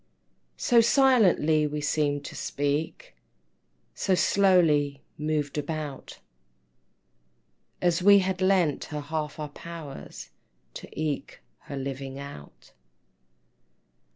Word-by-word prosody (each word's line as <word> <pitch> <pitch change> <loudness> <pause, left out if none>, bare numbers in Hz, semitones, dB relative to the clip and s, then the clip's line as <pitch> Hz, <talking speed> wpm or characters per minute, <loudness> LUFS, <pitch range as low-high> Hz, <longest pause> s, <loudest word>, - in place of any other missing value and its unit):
So 235 -2 +4
silently 215 - +4
we 150 0 -4
seem'd 145 -1 0
to - - -8
speak, 150 - -3 0.8
So 190 - +1
slowly 165 -9 +3
moved 150 -1 -2
about, 150 -2 -6 1.7
As 175 0 +2
we 200 +2 +7
had 190 -1 0
lent 185 -6 +2
her 150 -1 -5
half 150 0 -4
our 150 -1 -5
powers 160 -2 -9 0.4
To - - -9
eke 155 -2 -3 0.2
her 140 - -6
living 135 0 -5
out. 140 - -11
155 Hz, 95 wpm, -27 LUFS, 145-185 Hz, 1.7 s, we